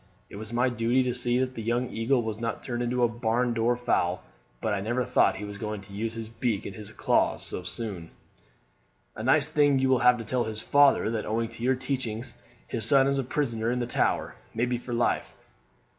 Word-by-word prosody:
It - - -8
was 110 +1 -7
my 120 +2 +2
duty 120 +2 +1
to 125 -1 -1
see 120 0 +2
that 130 0 0
the 115 - -6
young 120 +3 -1
eagle 120 +2 +1
was 110 -1 -4
not 115 - -3
turned 120 -1 -3
into 120 +1 0
a - - +6
barn 120 +1 0
door 115 +1 +2
fowl; 90 -7 0 0.4
but 110 - -1
I 100 - -1
never 120 +4 -1
thought - - +3
he 105 - -6
was 100 0 -8
going 105 -1 -4
to 100 0 -14
use 110 +3 -3
his 115 -1 -5
beak 115 -2 -2
and 95 - -6
his 105 -1 -8
claws - - +1
so - - -5
soon." 90 -2 -6 1.1
"A - - -6
nice 140 +5 +3
thing 145 -3 +3
you 130 0 +2
will 130 -1 +4
have 125 +1 +5
to 115 - -6
tell 120 +2 0
his 110 -1 -4
father, 140 -2 +4
that 110 -2 -3
owing 115 +1 -1
to 115 0 -10
your 130 +2 +2
teachings 125 -3 -3 0.3
his 115 - 0
son 135 +4 +5
is 140 0 +1
a - - 0
prisoner 120 -4 -1
in 125 - 0
the 120 - -1
Tower, 120 - 0 0.2
maybe 120 +1 0
for 125 - -9
life. 115 - 0
120 Hz, 225 wpm, -27 LUFS, 110-125 Hz, 1.1 s, a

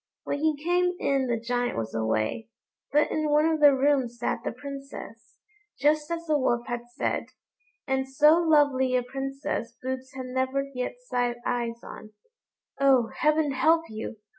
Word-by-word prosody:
When 285 - -2
he 310 -1 +1
came 360 +1 +2
in 275 -5 +1
the 235 -2 0
Giant 245 - -1
was 110 -1 -3
away, 110 - -1 0.4
but 295 +1 +3
in 310 -1 0
one 300 +1 +4
of 320 -1 +1
the 295 -1 +8
rooms 265 -3 +1
sat 240 - -1
the - - -2
Princess, 275 -4 -9 0.4
just 300 +2 +2
as 335 0 -3
the 305 -2 +2
Wolf 240 -2 +1
had 240 -1 -5
said, - - -1 0.6
and 265 -1 -1
so 300 +4 +5
lovely 285 -6 +3
a 250 - +2
princess 270 -2 -4
Boots 260 0 -5
had 260 -1 -5
never 260 +2 -1
yet 250 -1 -3
set 245 - -1
eyes 235 -1 -2
on. 215 0 -10 0.7
"Oh! 265 -4 +4
heaven 305 -1 +2
help 315 +5 +3
you! 220 +1 -6
265 Hz, 165 wpm, -27 LUFS, 240-295 Hz, 0.7 s, the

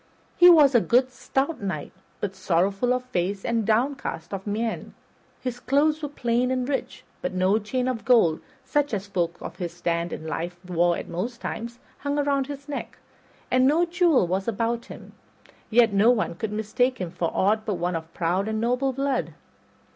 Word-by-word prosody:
He 355 0 +8
was 300 -5 +7
a 240 - +5
good 255 +3 +3
stout 270 +3 -2
knight, 195 -2 -4 0.3
but 200 -2 -2
sorrowful 190 +5 +1
of 250 0 +1
face 190 -3 -2
and 230 -3 0
downcast 250 +2 -1
of 195 +1 -5
mien. 220 +2 -3 0.5
His 245 -1 -4
clothes 300 +5 +2
were 295 - -3
plain 245 -2 0
and 255 -1 -1
rich, 275 -1 -3 0.2
but - - -3
no 185 +4 +3
chain 250 +4 -2
of 250 -3 -2
gold, 220 -11 +4 0.2
such 290 -2 +1
as 195 0 -4
folk 175 -4 -2
of - - -7
his 175 -3 -4
stand 170 0 -2
in 155 - -6
life 170 +2 -3
wore 175 -1 +2
at - - -6
most 230 +8 -4
times, 235 +1 -5 0.2
hung 285 +1 -2
around 280 -2 +1
his 280 0 -8
neck, 290 - -5 0.5
and 255 +1 +4
no 325 +5 +4
jewel 345 - +3
was 190 +4 -2
about 230 +2 -1
him; - - -11 0.6
yet 230 -1 +4
no 200 +4 +5
one 235 -7 +2
could 205 +5 -4
mistake 220 +4 0
him 180 -4 -4
for 170 -1 -1
aught 215 +3 +2
but 210 -2 -2
one 175 0 -1
of 165 0 -5
proud 180 +4 0
and 220 0 -1
noble 250 +4 +1
blood. 275 0 -1
230 Hz, 185 wpm, -25 LUFS, 190-260 Hz, 0.6 s, He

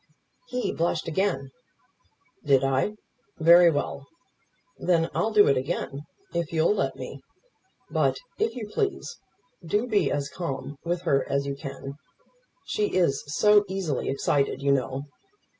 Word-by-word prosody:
He 250 - -2
blushed 165 -1 -1
again. 155 -6 -1 0.9
"Did 135 -2 +4
I? 135 +9 +1 0.4
Very 170 +1 +7
well. 145 -2 -3 0.7
Then 165 -2 +1
I'll 220 - +1
do 210 -2 +6
it 140 - +4
again 140 0 -3 0.3
if 170 -2 -2
you'll 165 +4 +3
let - - -1
me. - - -8 0.7
But, - - +2 0.2
if 440 -6 0
you 225 -4 -5
please, 400 - -3 0.4
do 205 +8 0
be 205 - +1
as 145 -1 -1
calm 140 -5 -5
with 175 +1 -2
her 140 -6 +1
as 140 0 0
you 140 - -2
can. 140 0 -8 0.7
She 420 -1 -1
is 170 -7 +2
so 210 +7 +5
easily 185 -8 -2
excited, 140 0 0
you 140 - +3
know. 135 0 0
160 Hz, 140 wpm, -26 LUFS, 140-195 Hz, 0.9 s, Very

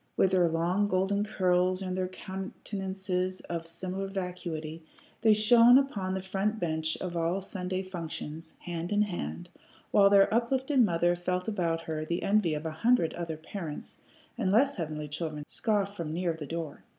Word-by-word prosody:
With 190 - +4
their 180 -2 +4
long 175 +5 +1
golden 195 +1 +1
curls 185 -2 +1
and 185 -1 -3
their 185 0 -1
countenances 190 -1 -4
of 165 -1 -5
similar 185 +3 -4
vacuity, 175 -4 -5 0.4
they 220 -2 +6
shone 235 +3 +7
upon 200 -9 0
the 190 - -3
front 200 +3 -1
bench 160 -2 -1
of 180 -2 -5
all 170 +3 0
Sunday 185 -1 -4
school 185 - -14
functions, 160 -2 -6
hand 170 0 -4
in 210 0 +4
hand, 80 - -5 0.4
while 200 -1 +6
their 200 +1 +5
uplifted 260 +4 +1
mother 175 -3 +2
felt 180 +1 -2
about 170 -6 0
her 155 -1 -3
the 170 +2 -2
envy 195 -6 +2
of 150 +2 -5
a 160 - -2
hundred 170 +1 +2
other 165 -2 -4
parents, 160 -1 -7 0.4
and 185 - +1
less 270 +7 +4
heavenly 155 -3 -4
children 150 0 -4
scoffed 205 -3 -1
from 165 -5 -4
near 175 0 0
the 155 -3 -7
door. 165 -2 -5
185 Hz, 170 wpm, -29 LUFS, 165-200 Hz, 0.4 s, shone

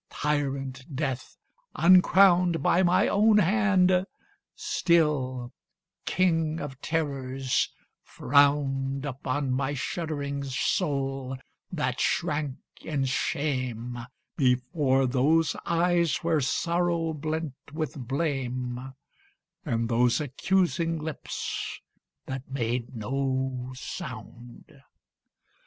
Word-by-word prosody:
Tyrant 135 -2 -2
Death, 135 -3 -3 0.4
uncrowned 180 -1 +5
By 180 0 +4
my 180 0 +4
own 210 +1 +4
hand, 190 -2 +3 0.5
still 135 -7 +1 0.5
King 165 -3 +1
of 135 -2 -7
Terrors, 135 -5 -1 0.3
frowned 140 -1 +2
Upon 135 0 -2
my 135 +2 0
shuddering 140 -1 -3
soul, 135 -1 -1 0.3
that 130 -8 -2
shrank 150 -5 0 0.3
in 140 -4 -1
shame 130 -3 -2 0.4
Before 130 0 +2
those 145 +5 +2
eyes 170 -1 +2
where 165 -2 +2
sorrow 170 +3 0
blent 155 -1 -3 0.2
with 155 0 -3
blame, 130 -3 -2 0.7
And 115 0 -1
those 120 +2 +3
accusing 165 +3 0
lips 155 -1 -5 0.5
that 130 -1 -6
made 120 -2 -2
no 130 +2 -2
sound. 120 -1 -9
140 Hz, 85 wpm, -27 LUFS, 130-165 Hz, 0.7 s, uncrowned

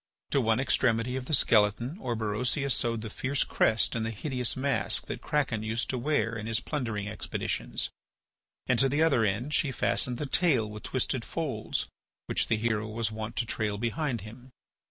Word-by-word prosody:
To 140 - +3
one 115 0 +2
extremity 125 -2 +2
of 130 -1 -4
the - - -2
skeleton 115 - +2
Orberosia 120 - -1
sewed 115 -3 0
the 110 - -5
fierce 135 +4 0
crest 110 +1 +2
and 115 - 0
the 115 - -1
hideous 125 +3 -2
mask 110 -7 +1
that 120 - -5
Kraken 140 -8 0
used 110 +1 -1
to 130 - -2
wear 120 -4 +1
in 110 -1 -5
his 115 0 +1
plundering 115 -8 -3
expeditions, 110 - -2 0.7
and 125 -3 +2
to 135 - +4
the 145 +4 +2
other 140 -8 +4
end 110 +8 0
she 150 - +2
fastened 125 -1 +1
the 150 - -3
tail 135 -7 +2
with 105 0 -8
twisted - - 0
folds - - -2 0.4
which - - +1
the 110 - +2
hero 110 -1 0
was 110 0 -1
wont 110 +2 -5
to 120 - 0
trail 110 -2 -1
behind 120 +3 -1
him. 120 +5 -11
115 Hz, 180 wpm, -29 LUFS, 110-130 Hz, 0.7 s, to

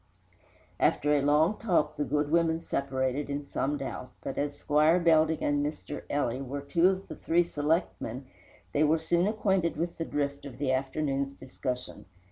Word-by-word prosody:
After 150 +1 +3
a 145 - +3
long 150 +8 +3
talk 175 -9 +1
the 150 - -1
good 145 +1 0
women 165 0 +2
separated 135 0 -1
in 140 0 -3
some 145 +1 -1
doubt, 135 -2 -5
but 135 - -4
as 145 0 -2
Squire 155 +4 +3
Belding 160 -2 +3
and 145 0 +1
Mr. 145 0 -4
Ely 130 -4 0
were 135 +1 -4
two 170 +5 +3
of 190 0 -3
the - - -7
three 175 +1 +2
selectmen, 145 -5 -1 0.5
they 145 - +2
were 155 +2 +4
soon 170 +3 +1
acquainted 195 -6 +1
with 170 +2 -3
the 165 - -1
drift 140 -2 -2
of 125 -3 -10
the 140 -1 0
afternoon's 135 +1 -1
discussion. 130 -1 -6
145 Hz, 170 wpm, -29 LUFS, 140-165 Hz, 0.5 s, were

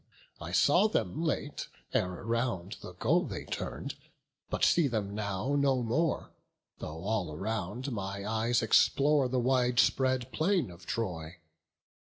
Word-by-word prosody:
I 85 0 -6
saw 145 - +5
them 165 -6 -1
late, 150 -2 -2 0.3
ere 90 0 -1
round 115 -6 -1
the - - -9
goal - - +2
they - - -6
turn'd, - - -4 0.6
But - - +2
see 170 -4 +4
them 105 -5 -2
now 105 +4 -2
no 135 -3 +2
more; 155 +8 0 0.5
though 80 +2 -6
all 100 -5 -1
around 110 - -3
My 100 -2 -4
eyes 115 +2 +1
explore 140 +4 +4
the 130 - 0
wide 125 -1 +2
spread 130 0 +2
plain 170 - +1
of 85 0 -14
Troy. 90 -7 -3
115 Hz, 140 wpm, -31 LUFS, 95-135 Hz, 0.6 s, saw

